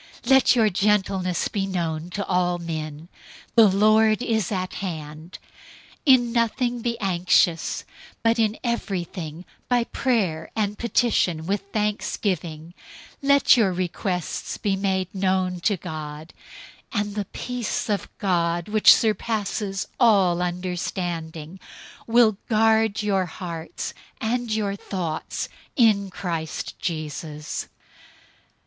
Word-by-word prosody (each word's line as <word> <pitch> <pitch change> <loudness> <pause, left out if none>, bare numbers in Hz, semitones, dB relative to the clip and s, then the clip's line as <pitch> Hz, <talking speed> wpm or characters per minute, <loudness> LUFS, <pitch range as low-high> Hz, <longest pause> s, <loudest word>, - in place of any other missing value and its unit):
004:005 - - -2
Let 265 -1 +6
your 225 -3 +4
gentleness 190 -2 +1
be 195 -2 -2
known 170 -3 -2
to 200 +2 -3
all 180 -1 +1
men. 160 -2 -5 0.5
The 225 -2 +7
Lord 215 +3 +4
is 220 -5 0
at 185 -2 -2
hand. 155 -2 -6 0.7
004:006 265 - +10
In 240 -2 -1
nothing 240 +1 0
be 235 0 -2
anxious, 180 -3 +2 0.4
but 230 +1 +3
in 220 -1 +2
everything, 180 -8 -3 0.2
by 245 -1 +3
prayer 200 -11 -1
and 210 -1 -1
petition 215 -9 +1
with 200 +3 0
thanksgiving, 180 -6 -2 0.5
let 280 0 +5
your 220 -6 +3
requests 180 0 -3
be 200 -2 0
made 190 -2 -1
known 185 -2 0
to 195 +3 +1
God. 155 -2 -7 0.6
004:007 215 - +2
And 205 -1 -7
the 205 -1 -2
peace 250 +3 -3
of 205 -4 -1
God, 175 -2 0
which 215 0 +7
surpasses 210 -2 -1
all 195 -8 +4
understanding, 175 -2 -4 0.5
will 225 -3 +4
guard 220 -1 +3
your 195 -3 +1
hearts 165 -1 -6 0.3
and 235 +1 -1
your 210 -2 0
thoughts 175 -6 -4 0.3
in 215 - +4
Christ 170 -4 -4
Jesus. 155 -2 -4
195 Hz, 115 wpm, -24 LUFS, 170-220 Hz, 0.7 s, 004:006